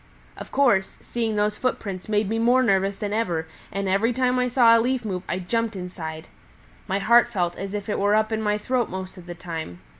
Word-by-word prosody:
"Of - - -10
course, 220 -9 +2
seeing 230 -2 -2
those 210 0 0
footprints 200 -7 -3
made 210 -1 +1
me 225 +2 -1
more 245 +3 +4
nervous 195 -3 +2
than 205 0 -3
ever, 175 -8 -1 0.2
and 200 0 -2
every 200 +6 +2
time 250 0 +1
I 250 - +2
saw 240 -2 +5
a 230 - +4
leaf 250 0 -1
move 185 -4 -3
I 175 - 0
jumped 225 +4 -1
inside. 170 -3 -6 0.6
My 195 0 0
heart 235 +4 +5
felt 175 -6 -1
as 195 +1 -5
if 205 -1 -4
it 210 - -1
were 205 +1 +3
up 215 +1 +1
in 220 0 -1
my 210 -1 +1
throat 245 +2 -1
most 185 0 -6
of 175 - -14
the 175 - -6
time. 165 - -6
210 Hz, 220 wpm, -24 LUFS, 185-230 Hz, 0.6 s, saw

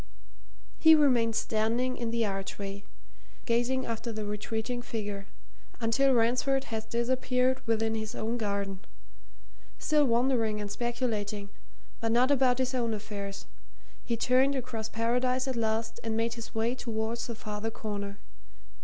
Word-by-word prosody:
He 320 0 +9
remained 245 -7 +4
standing 230 +4 +1
in 235 -1 -2
the 230 0 +1
archway, 195 0 -4 0.6
gazing 245 +2 +1
after 230 +1 -3
the 215 -1 -4
retreating 220 +4 -2
figure, 205 -4 -4 0.5
until 250 +3 +3
Ransford 250 +4 +2
had 220 -2 -5
disappeared 250 +2 +1
within 225 0 +1
his 220 +1 -3
own 230 +2 -2
garden; 200 -2 -2 1.0
still 300 -1 +3
wondering 235 -3 +2
and 205 -1 -4
speculating, 215 -4 -2 0.5
but 225 0 0
not 250 +4 +4
about 260 -3 +4
his 260 0 0
own 235 -3 0
affairs, 200 -2 -6 0.6
he 235 -2 -1
turned 260 +4 +3
across 240 -4 -3
Paradise 250 +3 +1
at 260 - -1
last 225 0 -1
and 225 -1 -1
made 230 +1 +1
his 230 -1 -8
way 225 +2 +1
towards 230 -1 -3
the 235 - -4
farther 210 0 -4
corner. 205 -3 -5
230 Hz, 135 wpm, -30 LUFS, 220-250 Hz, 1.0 s, He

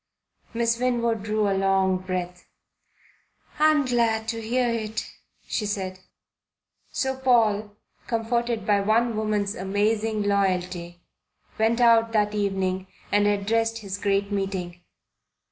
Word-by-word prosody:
Miss 230 0 +1
Winwood 235 -3 0
drew 215 0 0
a 200 - +1
long 195 -1 +2
breath. 180 -1 -5 1.1
"I'm 305 -2 +4
glad 230 -3 +1
to 230 -1 -3
hear 245 +3 0
it," 220 -2 -2 0.4
she 210 - -2
said. 190 -2 -3 0.9
So 265 0 -1
Paul, 220 -5 +2 0.3
comforted 235 -1 -1
by 205 -1 +3
one 225 +3 +2
woman's 210 -2 0
amazing 210 +3 0
loyalty, 180 -3 -1 0.6
went 225 +2 +2
out 230 -1 +4
that 210 -1 +2
evening 190 -2 -1 0.2
and 205 0 +3
addressed 225 +3 +1
his 200 -2 -6
great 200 0 0
meeting. 190 -3 -3
210 Hz, 115 wpm, -25 LUFS, 195-230 Hz, 1.1 s, I'm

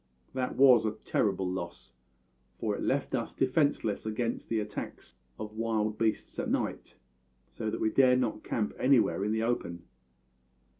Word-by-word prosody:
That 130 -1 -2
was 130 -4 +7
a 110 -1 0
terrible 95 -2 +1
loss, 85 -8 -6 0.6
for - - -1
it - - -5
left - - 0
us - - -2
defenceless 130 -6 +1
against 115 +2 -3
the 115 - +1
attacks 105 -1 -6 0.2
of 105 0 -6
wild 110 -1 -1
beasts 110 -1 -1
at - - -2
night, - - -2 0.6
so 110 - -3
that - - -3
we 110 - +1
dared 130 -2 +5
not 120 -4 -2
camp 105 -3 -1
anywhere 125 -6 +3
in 105 - 0
the 110 0 0
open. 85 -8 -2
110 Hz, 155 wpm, -30 LUFS, 105-125 Hz, 0.6 s, was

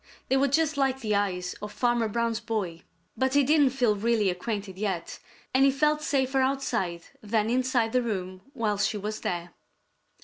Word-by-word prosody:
They 265 - +3
were 275 +1 +3
just 310 +2 +1
like 265 -1 +1
the 215 -3 -1
eyes 180 -3 0
of 210 0 -6
Farmer 240 +1 +1
Brown's 230 +1 -1
boy. 215 -8 -3 0.3
But 260 +3 0
he 285 - +6
didn't 290 0 +4
feel 245 -5 +1
really 215 -2 +2
acquainted 195 +1 -4
yet, 195 -5 -3 0.3
and 260 +1 +4
he 275 - +6
felt 300 +3 +2
safer 270 -2 +1
outside 235 -10 -1 0.2
than 215 +1 0
inside 250 -2 +1
the 250 - +2
room 185 -5 -4
while 215 -6 -1
she 210 +1 +1
was 210 +2 -4
there. 175 0 -3
230 Hz, 175 wpm, -27 LUFS, 205-265 Hz, 0.3 s, he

